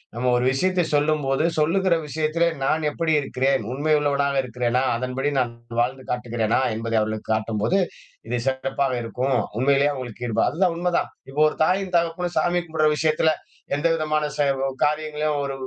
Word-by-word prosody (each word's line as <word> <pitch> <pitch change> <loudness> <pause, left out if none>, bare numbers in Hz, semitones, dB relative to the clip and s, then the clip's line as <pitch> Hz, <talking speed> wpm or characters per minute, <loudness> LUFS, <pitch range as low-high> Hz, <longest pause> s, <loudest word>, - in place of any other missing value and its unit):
நம்ம 125 +1 0
ஒரு 125 - 0
விஷயத்தை 180 +5 +1
சொல்லும்போது, 145 -1 +1
சொல்லுகிற 175 +3 +2
விஷயத்திலே 160 +3 +1 0.2
நான் 155 +1 +1
எப்படி 160 +1 0
இருக்கிறேன்? 135 -2 0
உண்மையுள்ளவனாக 140 -2 +1
இருக்கிறேனா? 125 +1 0
அதன்படி 130 +3 -2
நான் 120 -2 -1 0.3
வாழ்ந்து 130 +2 -2
காட்டுகிறேனா? 120 -1 0
என்பதை 115 0 -1
அவர்களுக்கு 110 0 -3
காட்டும்போது, 110 - 0 0.5
இது 120 - 0
சிறப்பாக 135 0 0
இருக்கும். 130 +3 -1 0.2
உண்மையிலயே 140 +2 +3
அவுங்களுக்கு 125 -3 -6
ஈடுபா 110 - +2
அதுதான் 175 +1 +1
உண்மதான். 175 0 0 0.2
இப்ப 150 +3 0
ஒரு - - -10
தாயும் 185 +1 0
தகப்பனும் 170 +1 -2
சாமி 175 0 +1
கும்பிடுற 155 -2 +1
விஷயத்துல 160 0 +2 0.4
எந்த 145 +4 +1
விதமான 155 -1 0
செ 145 - +1 0.4
காரியங்களையும் 150 0 0
ஒரு 140 -1 -3
145 Hz, 145 wpm, -23 LUFS, 125-160 Hz, 0.5 s, உண்மையிலயே